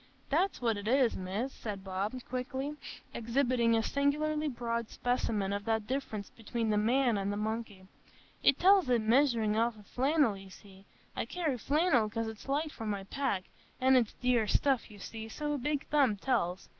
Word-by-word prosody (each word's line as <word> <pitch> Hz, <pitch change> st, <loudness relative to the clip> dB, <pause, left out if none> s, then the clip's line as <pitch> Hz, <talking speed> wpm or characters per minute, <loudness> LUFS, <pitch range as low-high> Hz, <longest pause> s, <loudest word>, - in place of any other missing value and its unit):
"That's 360 Hz, +7 st, +1 dB
what 225 Hz, -3 st, +2 dB
it 205 Hz, +1 st, -6 dB
is, 255 Hz, -1 st, +3 dB
Miss," 200 Hz, +8 st, -3 dB
said 205 Hz, -3 st, -6 dB
Bob, 195 Hz, +4 st, -3 dB
quickly, 265 Hz, +3 st, -3 dB, 0.4 s
exhibiting 235 Hz, -1 st, +2 dB
a 225 Hz, -, +2 dB
singularly 300 Hz, +3 st, 0 dB
broad 235 Hz, -3 st, -2 dB
specimen 215 Hz, -5 st, -1 dB
of 200 Hz, 0 st, -3 dB
that 220 Hz, -1 st, 0 dB
difference 225 Hz, -5 st, -4 dB
between 225 Hz, 0 st, -2 dB
the 210 Hz, -, +2 dB
man 235 Hz, +1 st, +2 dB
and 200 Hz, +1 st, -1 dB
the 205 Hz, -, -3 dB
monkey. 215 Hz, -3 st, -4 dB, 0.6 s
"It 275 Hz, -, +5 dB
tells 380 Hz, -5 st, +5 dB
i' 245 Hz, -, +4 dB
measuring 230 Hz, -1 st, +3 dB
out 230 Hz, 0 st, +1 dB
the 210 Hz, -, -14 dB
flannel, 270 Hz, 0 st, +2 dB
you 195 Hz, 0 st, -11 dB
see. 195 Hz, 0 st, -15 dB, 0.3 s
I -, -, -2 dB
carry 325 Hz, -7 st, -1 dB
flannel, 285 Hz, -5 st, +2 dB
'cause 225 Hz, +1 st, -2 dB
it's 220 Hz, +2 st, -8 dB
light 300 Hz, +3 st, 0 dB
for 225 Hz, -, -7 dB
my 200 Hz, -2 st, -2 dB
pack, 205 Hz, -3 st, -2 dB, 0.4 s
an' 260 Hz, +1 st, +5 dB
it's 240 Hz, -4 st, +3 dB
dear 245 Hz, -3 st, +1 dB
stuff, 265 Hz, +3 st, +1 dB
you 210 Hz, -, -12 dB
see, 220 Hz, +2 st, -7 dB
so 295 Hz, +5 st, -3 dB
a 290 Hz, -, -2 dB
big 295 Hz, +2 st, -1 dB
thumb 275 Hz, -8 st, +3 dB
tells. 190 Hz, -6 st, -1 dB
235 Hz, 180 wpm, -31 LUFS, 210-275 Hz, 0.6 s, It